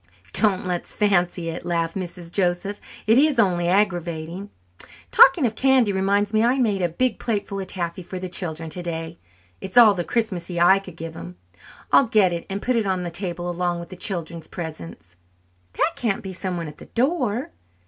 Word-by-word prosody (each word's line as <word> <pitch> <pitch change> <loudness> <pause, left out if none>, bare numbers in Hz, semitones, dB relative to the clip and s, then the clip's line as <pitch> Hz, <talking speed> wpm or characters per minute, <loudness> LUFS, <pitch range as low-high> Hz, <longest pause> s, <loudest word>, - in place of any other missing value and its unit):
"Don't 195 -3 +2
let's 180 -1 -3
fancy 175 -4 +1
it," 165 - -5
laughed 165 -1 -1
Mrs. 175 -2 -6
Joseph, 190 +2 -1 0.2
"it 225 +4 +5
is 295 -1 +3
only 180 -6 +2
aggravating. 175 -1 -1 0.6
Talking 270 +1 +7
of 225 - 0
candy 255 -4 +3
reminds 200 +2 +1
me 215 - +3
that 235 - +4
I 260 - +1
made 210 -7 +1
a 175 - +1
big 250 +8 -1
plateful 200 -3 -2
of 190 - -5
taffy 175 -1 -4
for 185 +1 -7
the 185 0 -4
children 165 -3 -4
today. 165 - -5 0.4
It's 190 +5 -5
all 225 -4 +9
the 175 -3 -2
'Christmassy' 185 -6 -2
I 185 +3 +6
could 185 -4 -12
give 165 0 -6
them. 90 - -9 0.6
I'll 275 - +6
get 205 -5 +3
it 170 - -4
out - - -33
and 195 +1 -4
put 250 -1 +1
it 220 -3 0
on 185 -1 0
the 175 - -4
table 175 0 -3
along 175 0 -1
with 170 - -9
the - - -8
children's 170 -3 -4
presents. 90 - -8 0.6
That 335 - +1
can't 230 -1 -1
be 190 -1 -6
someone 180 -3 -3
at 150 - -11
the - - -11
door!" 250 -3 0
185 Hz, 195 wpm, -23 LUFS, 170-210 Hz, 0.6 s, all